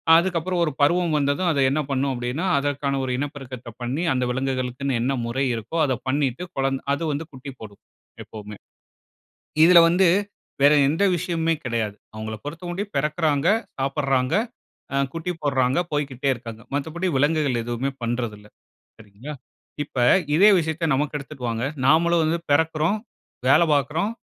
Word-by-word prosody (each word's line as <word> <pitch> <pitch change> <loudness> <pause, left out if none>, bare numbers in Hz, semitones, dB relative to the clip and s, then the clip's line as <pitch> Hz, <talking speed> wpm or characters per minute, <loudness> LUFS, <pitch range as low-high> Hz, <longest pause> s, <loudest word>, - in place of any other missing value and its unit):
அதுக்கப்புறம் 175 0 +1
ஒரு 155 - 0
பருவம் 170 +2 +3
வந்ததும் 145 +5 +1
அது 140 - 0
என்ன 155 +2 +1
பண்ணும் 135 0 0
அப்படீன்னா, 125 +8 -3
அதற்கான 140 -1 -1
ஒரு 130 - -2
இனப்பெருக்கத்த 135 -4 -6
பண்ணி 135 +8 -2
அந்த 125 -1 0
விலங்குகளுக்குன்னு 130 0 -2
என்ன 135 +3 0
முறை 130 +4 -1
இருக்கோ, 115 +9 -5
அத 130 - 0 0.2
பண்ணிட்டு 140 +2 0
குழந்த 135 0 0
அது 145 - -2
வந்து 150 +3 -3
குட்டி 130 +1 -8
போடும் 100 -2 -11 0.4
எப்பவுமே. 105 -1 -10 1.1
இதில 175 0 +8
வந்து 180 +1 +4 0.5
வேற 145 +2 +7 0.2
எந்த 165 +7 +1
விஷயமுமே 165 -1 0
கிடையாது. 110 -4 -2 0.2
அவுங்கள 110 0 -5
பொருத்தமட்டிலும் 175 +6 -5
பிறக்கிறாங்க, 150 0 +1 0.3
சாப்பிட்றாங்க, 135 0 0 0.6
அ - - +1 0.2
குட்டி 165 +2 -3
போடுறாங்க, 130 +1 +2
போய்க்கிட்டே 140 -2 -1
இருக்காங்க. 115 -2 -9
மத்தபடி 160 +6 -2
விலங்குகள் 145 -4 +1
எதுவுமே 120 +3 -2
பண்றதில்ல, 115 -3 -3 0.5
சரிங்களா? 115 +7 -10 0.5
இப்ப 135 - -14 0.4
இதே 205 +3 +7
விஷயத்த 160 -1 -1
நமக்கு 150 +1 -1
எடுத்துட்டு 135 -3 -7
வாங்க, 115 +2 -2 0.2
நாமளும் 165 +2 +4
வந்து 165 +2 0
பிறக்கிறோம், 160 +5 +2 0.5
வேலை 165 +5 +6
பார்க்கிறோம், 155 - 0
140 Hz, 140 wpm, -23 LUFS, 125-160 Hz, 1.1 s, இதில